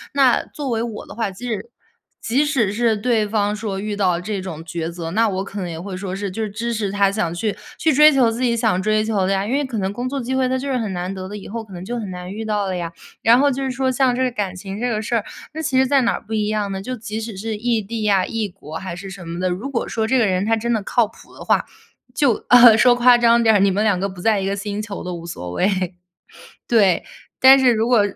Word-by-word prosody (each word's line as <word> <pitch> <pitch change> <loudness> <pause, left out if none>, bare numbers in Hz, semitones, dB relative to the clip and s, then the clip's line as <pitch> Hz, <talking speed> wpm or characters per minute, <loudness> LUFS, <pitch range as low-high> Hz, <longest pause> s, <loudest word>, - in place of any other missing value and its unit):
那 265 -3 +4
作 290 -3 -6
为 225 0 0
我 230 -3 -5
的 - - -11
话， 225 -2 -2
即 225 +7 -8
使 220 +1 -4 0.5
即 260 +6 +1
使 250 -10 +1
是 230 0 +1
对 215 -1 +1
方 205 -1 0
说 210 -3 -4
遇 210 -1 -4
到 180 -4 +1
这 205 +1 -3
种 165 -4 -7
抉 165 0 -4
择， 170 -1 -6
那 225 +4 +2
我 190 -1 -2
可 200 +1 -7
能 180 - -4
也 165 - -6
会 190 +1 -6
说 190 0 -5
是 200 -1 -4
就 225 - -4
是 215 - -2
支 230 +3 -3
持 210 -3 -2
他 200 0 +2
想 175 -5 -1
去 210 +2 -1 0.2
去 320 - +2
追 300 +1 +7
求 245 -4 +4
自 230 - -5
己 240 -2 +2
想 220 -5 +1
追 215 +1 +1
求 205 -4 0
的 195 - +1
呀。 195 +1 0
因 230 - -4
为 285 +1 +1
可 245 -4 -5
能 190 0 -1
工 245 +5 -4
作 275 0 -3
机 255 +2 -3
会 260 -1 +2
它 260 +1 0
就 275 +2 -4
是 255 - +1
很 215 -5 -3
难 180 +2 -3
得 185 -1 -6
的， 205 - -7
以 195 - -10
后 230 +2 -4
可 195 - -14
能 175 0 -7
就 240 +4 -4
很 205 -4 -5
难 180 +1 -7
遇 220 +1 -5
到 210 -2 -1
了 190 - -2
呀。 170 -1 -5 0.3
然 230 +2 +6
后 285 +1 +3
就 270 +2 -3
是 265 - -1
说 260 +1 0
像 255 -1 +2
这 260 - 0
个 255 - 0
感 195 -4 -3
情 195 +2 -7
这 245 - -1
个 215 -2 -1
事 235 +2 -2
儿， 220 - 0 0.3
那 315 - -4
其 265 -4 0
实 265 - +5
在 275 0 +3
哪 230 - +2
儿 - - -5
不 220 - -8
一 210 -1 0
样 210 -2 -1
呢？ 190 0 -4
就 255 +5 -4
即 220 -1 -5
使 225 -2 -6
是 215 +2 -4
异 230 0 0
地 215 +1 -4
啊、 190 -2 +3
异 225 -2 -2
国 160 -4 -9
还 185 -2 -6
是 195 +2 -8
什 180 -3 -9
么 170 +1 -5
的， 185 - +1
如 195 +10 -4
果 245 -4 -2
说 220 -1 -1
这 260 +2 +2
个 230 - +3
人 185 0 0
他 225 0 +2
真 235 +2 -2
的 220 -3 +1
靠 235 +3 +2
谱 225 - -18
的 - - -9
话， - - +2 0.5
就 260 -7 +1
呃， 240 -3 +8
说 245 +2 +5
夸 245 0 +6
张 235 0 +4
点 225 - +5
儿， - - +4
你 200 - +4
们 200 +3 0
两 200 -4 +2
个 195 - 0
不 185 -2 -10
在 215 -1 +2
一 190 - -2
个 200 +1 -1
星 205 +1 -4
球 210 -2 -6
都 180 0 -4
无 170 -1 -7
所 90 - -6
谓。 185 - 0 0.7
对， 200 -7 +3 0.4
但 265 +1 +8
是 255 -2 +4
如 225 +1 0
果， 240 -4 +4
215 Hz, 315 characters per minute, -20 LUFS, 195-240 Hz, 0.7 s, 呃